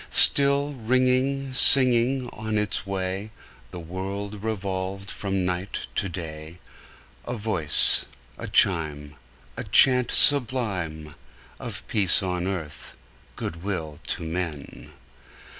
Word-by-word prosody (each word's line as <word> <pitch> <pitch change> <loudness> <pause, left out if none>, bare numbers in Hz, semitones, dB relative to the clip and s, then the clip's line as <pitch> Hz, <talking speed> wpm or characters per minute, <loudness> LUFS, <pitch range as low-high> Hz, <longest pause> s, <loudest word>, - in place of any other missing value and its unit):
Till, 140 +1 +6
ringing, 130 +2 -1
singing 130 0 +4
on 110 0 -5
its 105 -1 -3
way, 95 +1 -5 0.4
The 90 - -10
world 100 +4 -7
revolved 100 -2 -5
from 95 -2 -4
night 90 +2 -5
to 95 - -3
day, 80 -1 -9 0.7
A 125 - -5
voice, 100 -9 +4 0.3
a - - -9
chime, 75 -4 +1 0.4
A - - -5
chant 125 -2 +4
sublime 100 - +2 0.5
Of 110 -3 -8
peace 100 -4 +2
on 90 -1 -4
earth, 85 -6 -8 0.4
good 85 0 -7
will 80 -7 -6
to - - -4
men! 80 -3 -7
100 Hz, 110 wpm, -23 LUFS, 90-120 Hz, 0.7 s, Till